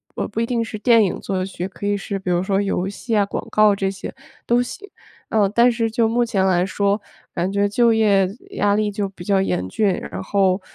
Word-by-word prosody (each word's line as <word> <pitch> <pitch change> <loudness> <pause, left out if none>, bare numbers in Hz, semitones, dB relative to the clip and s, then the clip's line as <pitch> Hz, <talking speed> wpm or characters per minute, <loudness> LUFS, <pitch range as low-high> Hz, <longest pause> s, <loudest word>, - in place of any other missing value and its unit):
呃 - - -2
不 215 - -5
一 230 - +1
定 235 -1 -1
是 225 -1 -6
电 225 +1 +4
影 190 - -1
作 190 -2 -2
曲， 185 -1 -5
可 200 +1 -6
以 205 0 +1
是 195 0 -4
比 190 - -5
如 175 0 +1
说 195 +1 +1
游 195 -2 -1
戏 215 +3 -2
啊， 205 - +3
广 200 - -5
告 215 -1 +4
这 195 -1 -1
些 195 -1 -7 0.3
都 240 +1 +3
行。 325 +11 -7 0.4
呃， 210 -3 +2
但 235 +4 +4
是 230 -1 -1
就 225 0 +1
目 240 +2 +1
前 210 -5 0
来 180 -2 +3
说， 200 +2 0 0.3
感 180 +2 -1
觉 200 0 +1
就 230 +3 +3
业 205 -4 +3 0.2
压 205 0 +1
力 210 0 0
就 200 -1 -3
比 190 -2 -11
较 195 +1 +2
严 90 - -1
峻。 200 - +1 0.2
然 - - -5
后 190 -1 +1
200 Hz, 250 characters per minute, -21 LUFS, 190-225 Hz, 0.4 s, 电